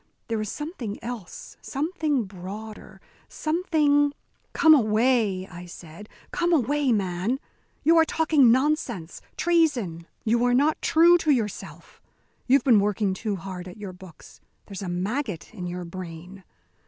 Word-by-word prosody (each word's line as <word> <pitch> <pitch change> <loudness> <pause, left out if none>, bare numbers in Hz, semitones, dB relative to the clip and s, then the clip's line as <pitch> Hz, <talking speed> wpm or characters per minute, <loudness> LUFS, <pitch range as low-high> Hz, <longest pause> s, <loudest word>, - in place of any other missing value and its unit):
There 225 -1 -1
is 215 - -4
something 295 - -5
else, 230 -7 -8
something 300 -3 -1
broader, 200 +3 -9 0.3
something 305 -3 +1 0.2
" - - -42
"Come 320 -1 +6
away," 220 -5 +2
I 175 -1 -10
said, 175 +4 -12 0.2
"come 345 0 0
away, 290 -2 +2
man! 195 +4 -1 0.4
You 330 +3 +5
are 325 - +7
talking 310 -7 +4
nonsense, 255 - -1 0.2
treason. 255 - +1 0.2
You 235 +2 +2
are 245 0 +3
not 295 +4 +2
true 345 +2 +5
to 320 - -2
yourself. 225 -8 -2 0.5
You've 265 0 +4
been 235 -6 +5
working 205 -1 0
too 205 +2 -3
hard 185 0 -7
at 180 - -10
your 200 -3 -7
books. 180 -3 -15 0.2
There's 195 -2 -8
a 190 - -4
maggot 200 - -3
in 180 -5 -6
your 175 0 -5
brain. 180 +1 -9
225 Hz, 140 wpm, -25 LUFS, 185-290 Hz, 0.5 s, are